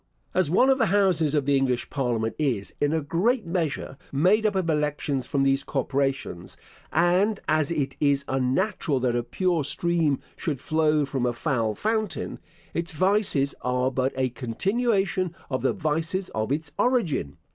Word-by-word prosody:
As 185 -5 +2
one 255 - +4
of 265 - +2
the 225 - +3
Houses 185 -7 +2
of 145 -3 +1
the 140 0 +3
English 125 -3 0
Parliament 120 -5 -1
is, 125 -10 -1
in 145 0 +2
a 160 0 +1
great 210 - +1
measure, 165 -5 -2
made 190 +10 +3
up 210 - -1
of 185 -3 0
elections 150 -3 -1
from 140 -1 +1
these 135 0 +2
corporations; 135 - -2 0.3
and 180 +5 +2
as 155 -2 +2
it 140 -5 -2
is 140 -1 +2
unnatural 135 +3 0
that 125 -1 +1
a 120 - +1
pure 175 +6 0
stream 160 -1 0 0.2
should 150 -7 -3
flow 155 +1 +2
from 135 -3 -1
a 120 - 0
foul 120 -5 -1
fountain, 215 - -2 0.3
its 170 +2 -2
vices 185 -5 +2
are 125 +1 0
but 130 +1 0
a 130 -1 +1
continuation 190 - 0 0.2
of 130 - -1
the - - +2
vices 165 +2 -1
of 110 +3 -2
its 150 +1 -2
origin. 225 - +1
150 Hz, 165 wpm, -25 LUFS, 135-185 Hz, 0.3 s, one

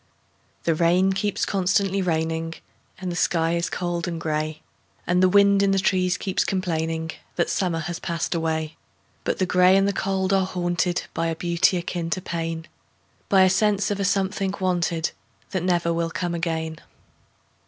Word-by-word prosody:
The 165 - +2
rain 175 +4 +3
keeps 205 +1 -1
constantly 195 0 +1
raining, 165 -1 -1 0.4
And 185 -1 -4
the - - -4
sky 165 -1 +1
is 170 0 0
cold 175 -1 -2
and 170 -2 -3
gray, 155 0 -2 0.4
And 180 +1 +2
the 185 - +5
wind 200 +1 +5
in 200 - +3
the 195 - +2
trees 185 -1 +2
keeps 190 -2 0
complainingThat 165 -2 -2
summer 180 -4 0
has 170 +2 -4
passed 170 +1 -2
away;—But 160 -1 -4
the 185 - +1
gray 180 +1 +5
and 195 0 +3
the 200 - +1
cold 190 0 0
are 190 -1 +2
hauntedBy 175 -2 -1
a - - -3
beauty 170 +2 +2
akin 170 -1 -3
to 185 - -1
pain,—By 165 +3 -2
a - - +6
sense 205 +1 +2
of 200 - -2
a - - 0
something 195 0 0
wanted, 175 -3 0 0.4
That 185 - -1
never 175 -1 +1
will 165 0 -1
come 175 +1 -3
again. 160 -2 -2
175 Hz, 160 wpm, -24 LUFS, 165-190 Hz, 0.4 s, a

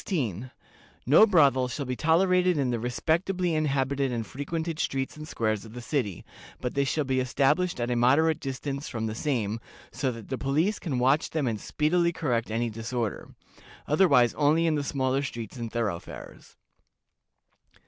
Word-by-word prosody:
No 155 - +7
brothel 140 - +4
shall 135 +3 -4
be 125 0 -3
tolerated 180 +3 +3
in 135 -3 +1
the 120 - -1
respectably 170 +9 0
inhabited 140 -3 0
and 115 -2 -2
frequented 160 +5 -4
streets 135 -1 -2
and 155 0 -9
squares 110 -7 -1
of 110 -1 -12
the 125 - -7
city, 120 - -3 0.3
but 125 - -3
they 140 0 +1
shall 150 +3 0
be 130 -1 0
established 140 +6 +1
at 120 +1 -1
a - - +1
moderate 145 +7 +3
distance 140 +1 -4
from 115 -2 -3
the 110 - -2
same, 115 -4 -1 0.3
so 130 - -1
that 115 -3 -10
the 130 - -3
police 155 +10 +1
can 145 -8 -3
watch 135 +5 +2
them 155 -3 -1
and 110 -4 -2
speedily 170 +3 +1
correct 125 -9 -1
any 115 +1 -1
disorder; 115 0 -4 0.6
otherwise 145 -7 +4
only 155 +3 +2
in 165 - +2
the 145 -1 -1
smaller 135 -1 0
streets 120 -3 -6
and 115 -2 -5
thoroughfares. 110 -7 -5
135 Hz, 165 wpm, -27 LUFS, 120-155 Hz, 0.6 s, No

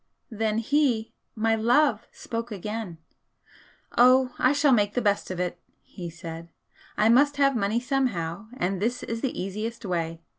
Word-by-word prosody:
Then 220 0 -1
he, 240 -2 +1 0.2
my 225 0 +1
love! 235 +1 +2
spoke 230 0 -5
again 210 -2 -5 1.0
'Oh, 255 +1 +5
I 255 - +4
shall 285 0 +3
make 205 -4 +2
the - - +2
best 205 -2 0
of 185 -1 -4
it,' 180 -1 -2 0.2
he 175 -3 -8
said 165 0 -9 0.5
'I 210 +2 +4
must 285 +4 +4
have 275 -1 +3
money 215 +1 +1
somehow, 220 - -2
and 185 +1 -1
this 240 +4 -1
is 230 0 -4
the 265 - -2
easiest 215 +5 -4
way. 165 -3 -2
225 Hz, 155 wpm, -26 LUFS, 190-250 Hz, 1.0 s, Oh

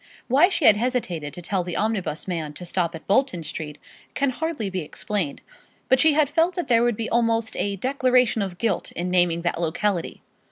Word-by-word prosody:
Why 285 +9 +5
she 345 -6 0
had 210 - +8
hesitated 210 - -2
to 175 - -9
tell 185 +1 -1
the 175 -1 -4
omnibus 195 -8 -1
man 160 -5 -3
to 180 - -9
stop 170 -1 -1
at 165 - -10
Bolton 200 -5 +1
Street 150 -1 -6 0.4
can 280 -2 +1
hardly 310 -5 -3
be 190 -1 -3
explained; 165 +1 -3 0.5
but 260 - +5
she 315 -1 +5
had 300 0 +3
felt 325 +5 +1
that 355 - -3
there 230 -2 +4
would 240 -3 +1
be 225 - -2
almost 230 -1 +1
a 200 0 -1
declaration 255 0 +2
of 190 -3 -4
guilt 220 -4 -1
in 180 +1 -3
naming 175 -2 +2
that 170 -1 -1
locality. 175 +2 -1
205 Hz, 200 wpm, -24 LUFS, 175-255 Hz, 0.5 s, had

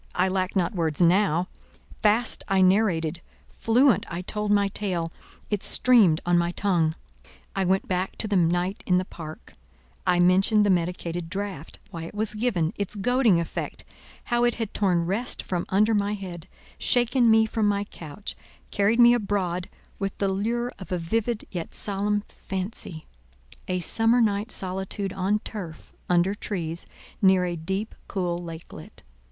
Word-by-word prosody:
I 185 +1 +2
lacked 185 +1 -1
not 180 -3 +1
words 160 -5 -1
now; 180 0 +3 0.5
fast 220 +3 +2
I 195 -1 +2
narrated; 180 -4 +2 0.3
fluent 235 -1 +3
I 170 +2 -4
told 210 +2 -2
my 200 -1 +3
tale; 180 -5 -2 0.4
it 205 -2 0
streamed 215 -11 +5
on 175 0 +3
my 170 0 0
tongue. 170 -6 +1 0.6
I 195 -1 +1
went 190 +2 +1
back 185 +1 -1
to 220 - -2
the 205 - 0
night 175 +3 +1
in 180 - +4
the 185 - 0
park; 160 -4 -10 0.5
I 180 - +4
mentioned 195 +4 +4
the 200 - +4
medicated 175 -1 -2
draught—why 185 -4 -6
it 170 - -10
was 215 0 -1
given—its 205 -3 -1
goading 230 -2 +3
effect—how 240 +7 -4
it 240 -1 +2
had 225 -3 -4
torn 180 -4 +1
rest 205 +8 -1
from 180 -2 -2
under 210 +4 +3
my 205 0 +1
head, 180 -5 -8 0.3
shaken 245 0 +3
me 220 0 +5
from 220 -1 0
my 200 0 +1
couch, 175 -1 -8 0.4
carried 205 +4 +2
me 240 0 +8
abroad 190 -5 -1 0.3
with 195 -1 -3
the 200 - 0
lure 235 +5 -1
of 190 - -10
a 180 - +1
vivid 220 +6 -1
yet 175 -4 -5
solemn 205 +1 +1
fancy—a 155 - -7
summer 225 +7 +4
night 210 0 +1
solitude 190 +1 -2
on 195 +2 +1
turf, 175 -8 -7 0.2
under 180 +2 +3
trees, 170 -5 -4 0.3
near 190 -2 +5
a 175 -1 -2
deep, 190 +6 -3
cool 175 -3 -2
lakelet. 165 -1 -10
190 Hz, 150 wpm, -25 LUFS, 175-210 Hz, 0.6 s, me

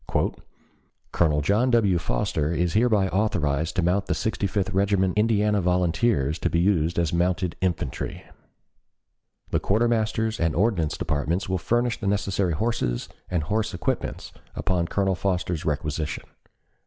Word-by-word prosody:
"Colonel 75 -3 +2
John 105 - +2
W. 105 -7 +3
Foster 75 +2 -1
is 85 0 0
hereby 110 -3 +3
authorized 85 -6 0
to 90 - +1
mount 95 +3 +1
the - - 0
Sixty 105 -2 -1
fifth 100 +1 -1
Regiment 95 -1 +1
Indiana 105 -1 +2
Volunteers 90 - +1
to - - 0
be 85 - +1
used 85 -3 +2
as 85 -2 +1
mounted 90 0 0
infantry. 85 -8 -2 1.3
The - - +2
Quartermaster's 110 0 +1
and 80 -2 +1
Ordnance 85 -5 +1
Departments 80 +5 -1
will 95 0 -1
furnish 120 +4 0
the 100 - -3
necessary 100 -3 0
horses 75 - -1 0.2
and 85 -4 0
horse 105 +4 -1
equipments 85 - -3 0.2
upon 90 -2 0
Colonel 95 0 +1
Foster's 90 -3 -2
requisition." 75 0 -2
95 Hz, 135 wpm, -25 LUFS, 85-105 Hz, 1.3 s, W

